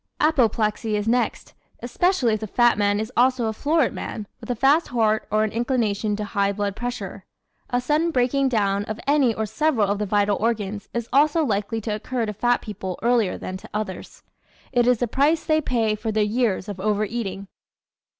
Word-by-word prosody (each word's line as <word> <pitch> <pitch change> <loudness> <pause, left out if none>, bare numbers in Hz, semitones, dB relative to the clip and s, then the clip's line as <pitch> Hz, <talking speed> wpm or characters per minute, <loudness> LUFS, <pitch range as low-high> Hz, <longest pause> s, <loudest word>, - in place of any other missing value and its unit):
Apoplexy 225 -7 +1
comes 210 +1 -2
next, 245 +2 0 0.3
especially 255 - +1
if 215 - -1
the 215 - -5
fat 240 +3 +3
man 205 0 +1
is 220 +2 -4
also 250 0 +3
a 220 - -1
florid 295 +4 +1
man 215 - -5
with - - -11
a 245 - 0
fast 280 +7 +3
heart 220 -3 +1
or 215 0 +2
an 215 - -1
inclination 225 -4 0
to 210 - -4
high 200 -1 0
blood 200 -1 -2
pressure. 215 -5 -5 0.5
A 245 - +1
sudden 300 +6 +1
breaking 265 -1 +1
down 200 -4 +1
of 215 +1 -5
any 280 -3 +3
or 220 - -1
several 245 -2 +1
of 200 +1 -1
the 210 - -1
vital 205 0 +2
organs 210 -2 -2
is 235 -1 -3
also 305 +3 +4
likely 210 -1 -1
to 215 0 -3
occur 235 +3 -2
to 210 - -4
fat 240 +4 +1
people 190 -4 -5
earlier 235 -5 +2
than 185 - -6
to - - -14
others. 210 -3 -5 0.5
It 245 -2 +2
is 250 -1 +4
the 245 - -1
price 290 +7 +1
they 310 0 +2
pay 230 -6 0
for 220 +1 -3
their 215 0 +2
years 210 -3 0
of 200 -3 -6
over 210 +1 +1
eating. 200 -3 -5
220 Hz, 200 wpm, -23 LUFS, 205-250 Hz, 0.5 s, also